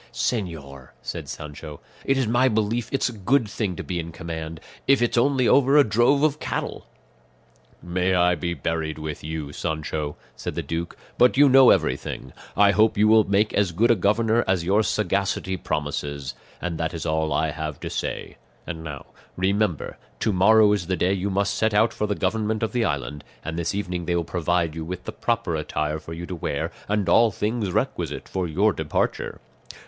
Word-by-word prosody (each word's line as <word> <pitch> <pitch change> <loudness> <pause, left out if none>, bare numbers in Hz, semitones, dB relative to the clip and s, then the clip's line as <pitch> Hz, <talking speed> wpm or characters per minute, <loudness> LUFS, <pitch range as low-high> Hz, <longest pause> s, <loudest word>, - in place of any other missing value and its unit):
"Señor," 75 - -3 0.2
said - - -5
Sancho, 75 0 -8 0.3
"it 135 - +2
is 135 - +2
my 120 +3 +3
belief 110 +1 0
it's 135 - +1
a - - -3
good 110 +4 +1
thing 100 -3 -3
to - - -6
be 90 -2 -3
in 85 0 -5
command, 80 -1 -6 0.3
if 135 0 +5
it's 120 0 +1
only 130 0 +3
over 140 +1 +5
a 145 - +8
drove 120 +6 +3
of 150 -1 +2
cattle." - - -4 1.0
"May 90 +1 0
I 90 0 +4
be 85 +1 -2
buried 80 +1 -2
with 75 -1 -6
you, 75 -2 -5
Sancho," 75 -1 -3 0.2
said - - -5
the - - -2
duke, 85 +1 -4 0.2
"but 125 +1 +5
you 145 +1 +7
know 135 -1 +7
everything; 65 - 0 0.2
I 100 0 +6
hope 105 +2 +3
you 105 +1 +5
will 110 -1 +6
make 100 +2 +2
as 100 -4 +2
good 115 +8 +3
a - - +5
governor 110 +4 +2
as 95 -2 +1
your 100 +4 +3
sagacity 100 -2 0
promises; 70 -4 -3 0.3
and 85 -2 -4
that 80 0 -2
is 80 - -5
all 80 0 0
I 80 -1 +1
have 75 -1 -5
to - - -4
say; - - -4 0.3
and 80 -1 -6
now 70 -4 -7 0.3
remember 95 -2 0 0.2
to 110 - +1
morrow 105 +3 +6
is 95 -5 -2
the 95 -1 0
day 90 +3 +2
you 100 +1 -1
must 100 +1 0
set 110 0 +1
out 110 +2 +4
for 105 - -2
the 105 - -1
government 110 +3 -1
of 110 - -1
the 120 -2 +1
island, 70 -1 -3 0.2
and 80 +1 -3
this 85 +3 -2
evening 90 -4 -3
they 85 +1 0
will 85 - +1
provide 85 -1 0
you 80 0 -5
with 90 +2 -6
the - - -5
proper 115 -7 -1
attire 75 0 -2
for 80 - -9
you 85 +1 -6
to 90 - -5
wear, 85 - -3 0.2
and 105 -1 0
all 115 0 +5
things 105 0 -2
requisite - - -2
for 95 -2 -2
your 100 +6 +2
departure." 80 -2 -2
95 Hz, 195 wpm, -24 LUFS, 80-110 Hz, 1.0 s, a